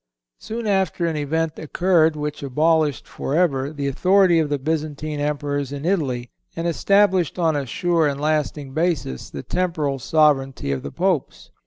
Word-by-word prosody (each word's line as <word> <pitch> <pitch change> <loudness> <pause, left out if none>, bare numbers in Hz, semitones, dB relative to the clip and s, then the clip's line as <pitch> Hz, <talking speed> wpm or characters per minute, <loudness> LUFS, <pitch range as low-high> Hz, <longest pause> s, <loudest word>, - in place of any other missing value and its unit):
Soon 230 +1 -5
after 190 -4 +1
an 165 -2 -1
event 155 +2 -1
occurred 160 0 +2
which 150 0 -4
abolished 150 +2 +1
forever 140 -3 0
the 145 -2 -3
authority 180 +4 +4
of 155 -2 0
the 145 - 0
Byzantine 155 0 -3
Emperors 145 -1 -2
in 145 +1 -5
Italy, 135 -10 -1 0.2
and 165 - -3
established 190 0 +2
on 165 -3 +2
a 140 -2 -2
sure 170 +5 +1
and 140 -1 -2
lasting 150 -2 -1
basis 155 - -1
the - - -7
temporal 155 -7 -1
sovereignty 135 - +2
of 65 -1 -2
the - - -7
Popes. 180 -5 -2
155 Hz, 155 wpm, -22 LUFS, 140-170 Hz, 0.2 s, authority